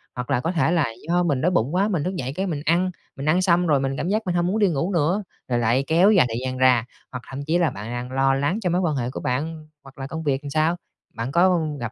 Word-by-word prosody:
hoặc 125 0 -5
là 120 - +2
có 165 +6 -1
thể 165 -1 +1
là 165 -5 +2 0.2
do 175 +1 +2
mình 145 -6 0
đói 180 +3 +2
bụng 145 0 0
quá, 195 +3 +2
mình 175 -8 -1
thức 185 +1 -3
dậy 130 -4 -4
cái 190 +1 -2
mình 150 -5 -3
ăn, 175 +3 +2 0.2
mình 140 - -6
ăn 180 +4 +3
xong 175 -1 +3
rồi 145 -3 +3
mình 135 0 -2
cảm 175 - -2
giác 215 +2 +1
mình 180 -1 -1
hông 175 0 +1
muốn 210 +4 0
đi 205 - +4
ngủ 165 +4 -1
nữa, 175 +6 +1 0.2
rồi 120 -1 0
lại 120 +4 +2
kéo 175 +6 +5
dài 185 -10 +5
thời 115 +2 -3
gian 130 0 -3
ra, 125 -3 +4 0.3
hoặc 125 -2 -7
thậm 135 +1 -6
chí 165 +3 +1
là 170 -3 +2
bạn 105 +1 -7
đang 120 +1 -5
lo 135 0 +2
lắng 145 +10 0
cho 180 - 0
mối 180 +2 +1
quan 160 -5 0
hệ 125 -2 -2
của - - -6
bạn 155 +5 -3 0.2
hoặc 135 -1 -15
là 135 0 -5
công 160 +2 -5
việc 135 -2 0
sao? 155 +3 +1 0.4
Bạn 115 +4 -4
có 175 +1 +4 0.2
gặp 120 -2 -4
155 Hz, 290 wpm, -23 LUFS, 130-175 Hz, 0.4 s, kéo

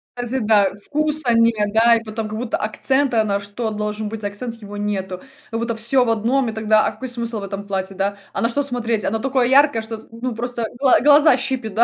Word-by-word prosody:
Кстати 245 +2 -3
да, 210 -3 +3 0.2
вкуса 300 -4 +1
нет 220 -3 +2
да, 230 +1 +5
и 225 - -2
потом, 215 0 -5
как 215 +1 -6
будто 245 -2 -2
акцента, 250 +1 +1
на 200 -1 -1
что 205 +3 -4
должен 210 0 -4
быть 220 -1 -7
акцент, 215 +4 -4
его 205 -2 -11
нету, 190 -3 -3 0.3
как 225 - -2
будто 235 -1 -2
всё 245 +3 +3
в - - -1
одном 235 +3 +1
и - - -3
тогда, 215 0 +2
а - - 0
какой 260 - -8
смысл 235 -2 -3
в - - -8
этом 200 0 -6
платье, 190 -1 -3
да, 200 +1 -2 0.2
а - - -2
на 230 - +2
что 285 +4 0
смотреть? 235 -5 0
Оно 225 +2 -1
такое 255 0 +1
яркое, 275 -3 +4
что 220 0 -6
тут, 225 - -19
ну 255 -2 -1
просто 240 0 -3
гла 270 -3 +4
глаза 295 -1 +6
щипет, 250 -6 -3
да? 235 - +5
225 Hz, 235 wpm, -20 LUFS, 210-245 Hz, 0.3 s, глаза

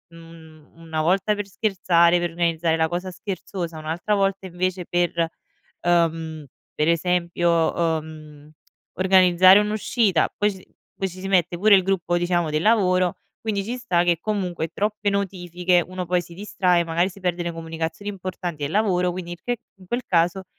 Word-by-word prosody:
un 165 -2 -15
una 165 -1 -5
volta 195 +5 +2
per 205 - -4
scherzare, 180 -4 +2
per 175 -1 -1
organizzare 165 -1 0
la 160 0 +1
cosa 180 +3 -4
scherzosa, 180 -3 -6
un'altra 160 +7 -2
volta 195 -1 0
invece 185 0 -2
per, 170 -1 0 0.5
ehm, 165 -3 0 0.3
per 150 +2 +1
esempio, 170 -1 +1 0.2
ehm, 155 -1 -12 0.5
organizzare 185 0 +6
un'uscita. 210 -2 +1
Poi 210 0 +1
ci 190 -1 -14 0.3
poi 195 - -2
ci 185 +1 -12
si 195 - -5
mette 180 -2 +2
pure 210 +3 +6
il 190 - +5
gruppo, 175 -2 0
diciamo, 175 -2 0
del 155 +1 0
lavoro, 185 -5 +3 0.2
quindi 205 -3 -2
ci 240 +4 -4
sta 175 -8 +1
che 170 -2 +2
comunque, 180 -6 -2
troppe 210 0 -1
notifiche, 180 -2 0
uno 185 0 -5
poi 180 +1 +1
si 170 0 -13
distrae, 180 -2 +1
magari 170 +2 +1
si 195 +1 -13
perde 180 -1 -1
le 170 - -2
comunicazioni 165 +3 -5
importanti 180 -5 -6
del 140 - -2
lavoro. 185 -4 +2
Quindi 175 -1 -6
il 175 - -9
che 245 0 -1 0.2
in 185 - -15
quel 245 +1 -2
caso, 175 +2 +1
175 Hz, 165 wpm, -23 LUFS, 165-195 Hz, 0.5 s, organizzare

